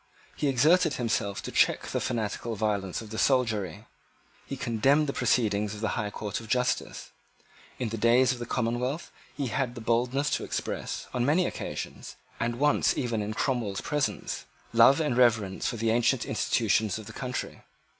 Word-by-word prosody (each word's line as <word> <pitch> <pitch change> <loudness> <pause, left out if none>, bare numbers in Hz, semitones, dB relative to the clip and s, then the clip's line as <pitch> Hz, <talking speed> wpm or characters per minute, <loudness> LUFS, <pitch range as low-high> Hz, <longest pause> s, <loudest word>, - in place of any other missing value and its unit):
He 150 - -1
exerted 150 +5 +4
himself 110 -4 -1
to - - -5
check - - +3
the - - -2
fanatical 115 +1 -2
violence 100 -2 -1
of 110 - -12
the 110 - -4
soldiery. 110 - +1 0.6
He - - -5
condemned 135 +6 +2
the 140 - -2
proceedings 105 -4 +1
of 105 - -9
the 110 - 0
High 105 - -2
Court 105 0 -4
of 115 - -11
Justice. 125 +2 -1 0.7
In 125 -3 -2
the 115 0 -4
days 120 +3 +4
of 125 - -4
the 120 - -5
Commonwealth 125 +6 -2 0.3
he 140 -4 -1
had 125 +1 -1
the - - -6
boldness 125 +5 +1
to - - 0
express, - - -4
on 125 - 0
many 155 +7 +3
occasions, - - -5 0.2
and 120 0 -1
once 145 +2 +2
even 115 -4 -1
in 105 +1 -4
Cromwell's 115 -8 -1
presence, 150 -2 -2 0.3
love 115 +6 +7
and 150 -6 0
reverence 110 -6 +2
for 120 - -2
the 115 0 +1
ancient 120 +1 +2
institutions 110 -3 +1
of 110 - -8
the - - -10
country. 125 -1 -5
120 Hz, 175 wpm, -28 LUFS, 110-130 Hz, 0.7 s, love